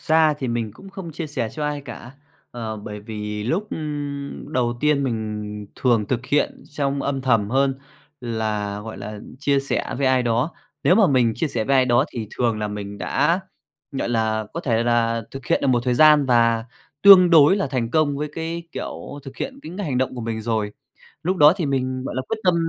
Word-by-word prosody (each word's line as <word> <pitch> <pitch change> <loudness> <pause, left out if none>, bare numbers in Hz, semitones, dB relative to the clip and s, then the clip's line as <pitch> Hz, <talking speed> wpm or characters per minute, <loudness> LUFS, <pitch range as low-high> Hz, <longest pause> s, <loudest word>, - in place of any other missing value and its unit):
ra 155 -1 +3
thì 130 -3 -3
mình 115 -2 -2
cũng 195 - -13
không 190 -4 -7
chia 165 +1 -4
sẻ 130 -7 -3
cho 150 - -4
ai 150 -1 -2
cả, 120 -1 -9 0.4
ờ, 115 -2 -5
bởi 105 0 -7
vì 105 -1 -5
lúc, 180 - -1
ưm, 145 -1 -5
đầu 120 -1 0
tiên 150 -2 +2
mình 105 -3 -4
thường 115 -5 +2
thực 130 -1 -2
hiện 145 - 0
trong 140 -1 -1
âm 135 -1 -1
thầm 115 -6 +2
hơn 135 +1 +1 0.4
là, 110 -4 -2
gọi 110 -1 -8
là, 105 +1 -7 0.2
chia 140 0 +2
sẻ 135 - -2
với 135 - +1
ai 130 -1 +3
đó. 120 +7 0 0.3
Nếu - - +6
mà 215 -4 +5
mình 125 -5 +3
chia 160 - -1
sẻ 115 -4 -2
với 135 +3 +3
ai 130 - +5
đó 120 -1 +3
thì 115 -2 -4
thường 115 -3 +1
là 105 -1 -2
mình 100 -1 -6
đã, 175 - +1 0.5
gọi 135 - -2
là, 110 -2 0
có 170 - -4
thể 115 -7 +1
là 115 -1 +1
thực 135 -3 -9
hiện - - +2
được - - 0
một 125 -2 +3
thời 125 - +2
gian 150 0 +6
và 115 -2 +3 0.4
tương 185 -3 +9
đối 160 +4 +7
là 195 - 0
thành 125 -3 -2
công 150 -2 +2
với 150 +1 -3
cái 165 +1 -4
kiểu 145 - -6
thực 135 -1 -10
hiện 270 0 -5
cái - - -8
ngành 165 -10 -2
động 130 0 0
của 125 - -5
mình 110 -1 -3
rồi. 110 -2 -1 0.5
Lúc 185 +3 0
đó 150 0 +8
thì 165 -6 -1
mình, 130 -1 -1
gọi - - -4
là, 130 - -1
quyết 225 - -2
tâm 180 -2 +4
130 Hz, 215 wpm, -22 LUFS, 115-150 Hz, 0.5 s, tương